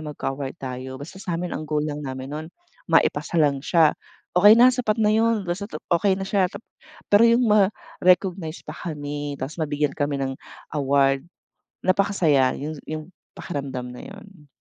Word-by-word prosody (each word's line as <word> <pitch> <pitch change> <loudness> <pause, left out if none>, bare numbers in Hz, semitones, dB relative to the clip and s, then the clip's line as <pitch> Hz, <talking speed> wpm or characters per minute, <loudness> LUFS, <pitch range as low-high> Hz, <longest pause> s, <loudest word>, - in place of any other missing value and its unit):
magka-award 140 -3 -5
tayo 130 0 -6
basta 165 +8 -10
sa 175 -3 -3
amin 175 +1 -4
ang 155 0 -5
goal 150 -1 0
lang 150 -1 -4
namin 130 0 -6
nun, 155 +1 -5 0.4
maipasa - - +2
lang 145 -4 +3
siya 160 0 +4 0.4
okey 205 +5 +7
na 250 +2 +7
sapat 235 -4 0
na 215 -1 +3
yun 225 -1 +2
basta't 185 +3 -4 0.2
okey 190 +3 +3
na 195 - -4
siya. 190 -1 +2 0.7
Pero 210 +3 +7
yung 235 +2 +4
ma-recognize 185 -4 +1
pa - - -7
kami 145 -3 -5
tapos 140 +5 -6
mabigyan 145 -1 0
kami 145 0 0
ng 135 -1 -2 0.4
award 140 -1 +2 0.6
napakasaya 180 -9 +3
yung 150 +2 -5
yung 155 0 -4 0.3
pakiramdam 135 -6 -5
na 125 - -10
yun. 200 -6 -14
155 Hz, 155 wpm, -23 LUFS, 140-195 Hz, 0.7 s, okey